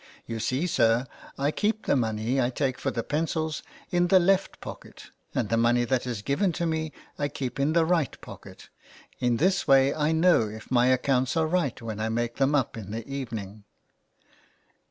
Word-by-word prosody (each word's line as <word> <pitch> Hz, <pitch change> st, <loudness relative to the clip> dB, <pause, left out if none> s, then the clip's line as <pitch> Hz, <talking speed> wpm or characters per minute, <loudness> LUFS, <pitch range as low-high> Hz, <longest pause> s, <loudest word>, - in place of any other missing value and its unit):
You 115 Hz, -1 st, -5 dB
see, 130 Hz, +8 st, 0 dB
sir, 120 Hz, -6 st, +2 dB, 0.3 s
I 140 Hz, +2 st, +1 dB
keep 215 Hz, +5 st, -1 dB
the -, -, +2 dB
money 115 Hz, +1 st, 0 dB
I 120 Hz, -, +1 dB
take 130 Hz, 0 st, -2 dB
for -, -, -1 dB
the 115 Hz, -, -3 dB
pencils 155 Hz, +2 st, -2 dB, 0.3 s
in 175 Hz, 0 st, +2 dB
the 190 Hz, -, +6 dB
left 190 Hz, +2 st, +1 dB
pocket, -, -, -10 dB, 0.2 s
and 115 Hz, -5 st, 0 dB
the 115 Hz, -, +2 dB
money 120 Hz, +1 st, +3 dB
that 130 Hz, 0 st, 0 dB
is 115 Hz, -4 st, -4 dB
given 175 Hz, -, +1 dB
to 170 Hz, 0 st, -2 dB
me 160 Hz, -1 st, -1 dB, 0.3 s
I 145 Hz, -, +1 dB
keep 135 Hz, -2 st, -5 dB
in 145 Hz, +3 st, +2 dB
the 165 Hz, -1 st, +4 dB
right 165 Hz, -7 st, 0 dB
pocket. -, -, -12 dB, 0.5 s
In 120 Hz, -1 st, +1 dB
this 185 Hz, +6 st, +1 dB
way 135 Hz, 0 st, +5 dB
I 150 Hz, 0 st, +1 dB
know 160 Hz, -8 st, +4 dB
if 110 Hz, +3 st, -10 dB
my 125 Hz, -1 st, +4 dB
accounts 130 Hz, +1 st, +2 dB
are 160 Hz, -, +3 dB
right 160 Hz, -5 st, 0 dB
when 110 Hz, -2 st, -6 dB
I 110 Hz, +1 st, -1 dB
make 120 Hz, +1 st, -2 dB
them 140 Hz, +2 st, +2 dB
up 130 Hz, -5 st, 0 dB
in 105 Hz, -3 st, -7 dB
the 110 Hz, +1 st, -5 dB
evening.'' 110 Hz, -7 st, -6 dB
135 Hz, 195 wpm, -27 LUFS, 115-160 Hz, 0.5 s, the